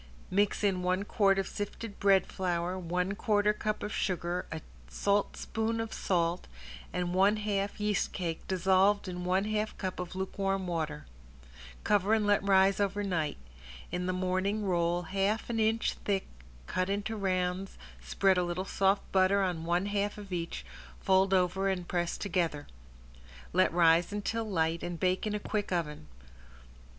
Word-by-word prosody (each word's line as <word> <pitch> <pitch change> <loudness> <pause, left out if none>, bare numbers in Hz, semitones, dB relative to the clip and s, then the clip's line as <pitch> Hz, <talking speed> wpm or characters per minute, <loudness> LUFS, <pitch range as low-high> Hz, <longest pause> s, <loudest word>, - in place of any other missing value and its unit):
Mix 205 +2 +1
in 190 -3 +2
one 185 +2 +1
quart 195 -2 +3
of 195 - 0
sifted 205 +1 -6
bread 195 -2 +4
flour, 180 -1 -2
one 180 +2 -1
quarter 210 0 +2
cup 215 0 -3
of 210 - -4
sugar, 175 -1 -1
a 160 - -4 0.3
saltspoon 220 - -1
of 225 -1 -3
salt 175 -1 0 0.4
and 175 0 -2
one 195 +3 +4
half 205 -1 -2
yeast 210 -1 0
cake 170 -4 -4
dissolved 190 +2 +3
in 180 -1 -5
one 185 +2 +2
half 215 0 -2
cup 185 -2 -4
of 180 0 -5
lukewarm 195 0 -1
water. 160 - -3 0.8
Cover 205 +1 +3
and 215 -1 +1
let 205 0 +3
rise 195 0 +4
over 205 0 0
night. 165 -7 -1 0.5
In 180 +1 -2
the - - +1
morning 185 +3 0
roll 175 -1 +1
half 195 +7 -1
an 225 - -1
inch 220 +1 +2
thick 195 -2 0 0.4
cut 185 - -1
into 205 +2 -2
rounds, 185 -1 -1 0.3
spread 185 - +2
a - - +2
little 175 +2 -2
soft 195 +1 +2
butter 195 +1 +4
on 175 -3 -2
one 175 +3 +1
half 205 0 -1
of 200 -3 -8
each, 170 -1 -4 0.3
fold 190 0 +3
over 190 +1 +2
and 180 -2 -2
press 175 -1 -1
together. 170 -6 -1 0.9
Let 185 +1 +4
rise 170 +1 +4
until 220 +2 -2
light 165 -3 0
and 175 -1 -4
bake 185 +3 +1
in 210 - -1
a - - -1
quick 205 -1 -3
oven. 150 - -2
190 Hz, 160 wpm, -30 LUFS, 180-205 Hz, 0.9 s, bread